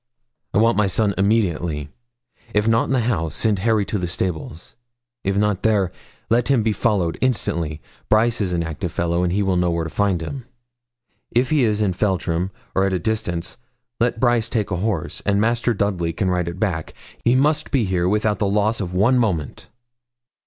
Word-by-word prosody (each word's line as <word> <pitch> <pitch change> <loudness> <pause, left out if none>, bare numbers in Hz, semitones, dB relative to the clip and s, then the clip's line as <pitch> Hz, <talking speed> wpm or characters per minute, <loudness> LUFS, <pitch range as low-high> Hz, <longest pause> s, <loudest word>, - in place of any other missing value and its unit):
'I - - 0
want 115 +1 +4
my 105 -1 +3
son, 100 +2 +1
immediately. 85 -8 0 0.7
If 105 +1 +2
not 115 0 +3
in - - -4
the 130 -2 +2
house, 85 -10 -1
send 105 -4 +1
Harry 110 0 +2
to 105 +1 -2
the 90 - -2
stables; 85 -2 -4 0.5
if 100 0 0
not 105 -2 +1
there, 100 -5 +2 0.4
let 115 +1 +2
him 135 -5 +3
be 110 -1 +1
followed, 95 -5 0
instantly. 85 - -1 0.3
Brice 115 +1 +3
is 95 -3 0
an 85 -1 0
active 80 +1 -4
fellow, 85 0 0
and 90 -1 +1
will 95 -1 +1
know 90 0 +2
where 85 -1 -1
to 80 - -5
find 100 -4 +1
him. 125 - -6 0.8
If 125 +3 +1
he 150 -4 +3
is 105 -2 +2
in 95 -3 +1
Feltram, 90 -2 0 0.2
or 95 - +2
at 95 - -1
a - - +2
distance, 90 -4 -2 0.4
let 120 -1 +1
Brice 120 -2 +2
take 105 -3 -1
a 90 - 0
horse, 95 -3 -2
and 100 0 +2
Master 115 +2 +1
Dudley 95 -6 -1
can 95 +2 0
ride 90 -1 0
it 85 +2 -5
back. 90 -7 -2 0.3
He 120 +2 +4
must 145 +3 +2
be 130 -6 +1
here 90 -1 +1
without 105 0 +1
the 100 - +1
loss 105 +2 +1
of 90 -2 -4
one 120 +7 +4
moment.' 90 - -2
100 Hz, 195 wpm, -21 LUFS, 90-110 Hz, 0.8 s, want